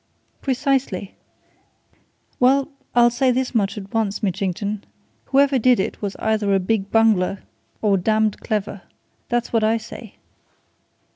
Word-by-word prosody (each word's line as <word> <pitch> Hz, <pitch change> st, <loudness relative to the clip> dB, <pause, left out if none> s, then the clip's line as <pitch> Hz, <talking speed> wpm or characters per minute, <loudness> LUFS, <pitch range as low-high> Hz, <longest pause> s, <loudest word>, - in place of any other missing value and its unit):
"Precisely! 265 Hz, -7 st, -1 dB, 1.3 s
Well 270 Hz, +3 st, +3 dB, 0.3 s
I'll 240 Hz, 0 st, +6 dB
say 255 Hz, +2 st, +1 dB
this 255 Hz, +1 st, 0 dB
much 205 Hz, -2 st, 0 dB
at 195 Hz, -1 st, -8 dB
once, 220 Hz, -1 st, -1 dB
Mitchington. 200 Hz, +1 st, -2 dB, 0.4 s
Whoever 275 Hz, -1 st, +3 dB
did 250 Hz, 0 st, +4 dB
it 190 Hz, -, -3 dB
was 200 Hz, -2 st, -3 dB
either 215 Hz, -2 st, +1 dB
a -, -, +3 dB
big 195 Hz, +1 st, -1 dB
bungler 205 Hz, -4 st, +2 dB, 0.4 s
or 200 Hz, -2 st, +3 dB
damned 215 Hz, +2 st, +1 dB
clever! 205 Hz, -3 st, -3 dB, 0.5 s
That's 240 Hz, 0 st, -1 dB
what 225 Hz, -2 st, +2 dB
I 220 Hz, +1 st, +3 dB
say!" 225 Hz, -, -10 dB
220 Hz, 130 wpm, -21 LUFS, 200-245 Hz, 1.3 s, I'll